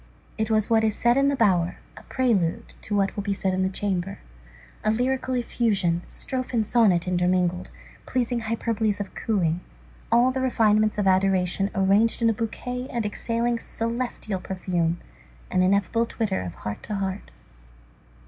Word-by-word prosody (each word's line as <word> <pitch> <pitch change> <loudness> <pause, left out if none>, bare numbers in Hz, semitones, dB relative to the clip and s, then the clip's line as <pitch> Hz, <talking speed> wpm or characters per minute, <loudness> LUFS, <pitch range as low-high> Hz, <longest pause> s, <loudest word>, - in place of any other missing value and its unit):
It 220 0 -1
was 215 -1 +2
what 225 -1 +3
is 220 -1 +1
said 240 0 +3
in 275 +1 +3
the 280 - +2
bower, 180 -8 +2 0.2
a - - -11
prelude 220 -11 0
to 210 - -3
what 195 -1 +1
will 205 - -2
be 200 0 -1
said 190 -1 -1
in 185 - 0
the 190 - +1
chamber; 195 -1 -2 0.7
a 215 - +2
lyrical 255 +3 0
effusion, 205 -8 0
strophe 255 -1 -3
and 220 -2 +2
sonnet 200 -7 +3
intermingled, 180 0 +1 0.4
pleasing 245 -1 0
hyperboles 220 -2 -1
of 205 - -5
cooing, 175 -6 0 0.5
all 240 +2 +5
the 260 0 -2
refinements 215 -4 +2
of 205 - +1
adoration 190 0 +2
arranged 200 +4 +3
in 230 - +5
a - - 0
bouquet 245 +3 -4
and 235 -2 -2
exhaling 230 +3 -1
a - - -11
celestial 230 -3 -3
perfume, 175 -3 -1 0.5
an 185 - +2
ineffable 200 +5 +2
twitter 215 - -2
of 90 -2 -6
heart 105 +2 -6
to 210 - -4
heart. 195 0 -3
210 Hz, 165 wpm, -25 LUFS, 185-230 Hz, 0.7 s, all